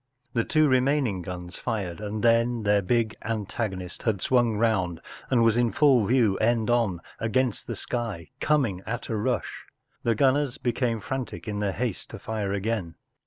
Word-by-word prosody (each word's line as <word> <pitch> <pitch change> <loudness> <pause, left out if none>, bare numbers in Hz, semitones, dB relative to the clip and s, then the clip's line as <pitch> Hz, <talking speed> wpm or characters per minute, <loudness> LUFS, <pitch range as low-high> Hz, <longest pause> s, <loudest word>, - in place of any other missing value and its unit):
The 115 - +2
two 155 +4 +3
remaining 130 -6 +2
guns 90 0 -7
fired, 105 -6 -3
and 105 0 -4
then 115 0 +3
their 100 0 +3
big 110 +2 +1
antagonist 100 -4 -3
had 110 -4 0
swung 120 0 +2
round 95 -7 +1 0.3
and 120 -3 +4
was 115 -1 +4
in 120 -2 +2
full 130 -3 +4
view, 115 -6 +3
end 115 0 +2
on, 110 -8 +1 0.2
against 125 +1 0
the - - -3
sky, 110 - -4
coming 130 -12 +1
at 120 +2 -4
a 115 - -1
rush. 105 - -2 0.3
The 115 -1 +1
gunners 135 +2 +2
became 120 -2 -1
frantic 130 +1 -5
in 105 -1 -2
their 100 -2 0
haste 120 -4 -3
to - - -7
fire 105 -3 -3
again. 100 -4 -2
115 Hz, 165 wpm, -26 LUFS, 100-120 Hz, 0.3 s, and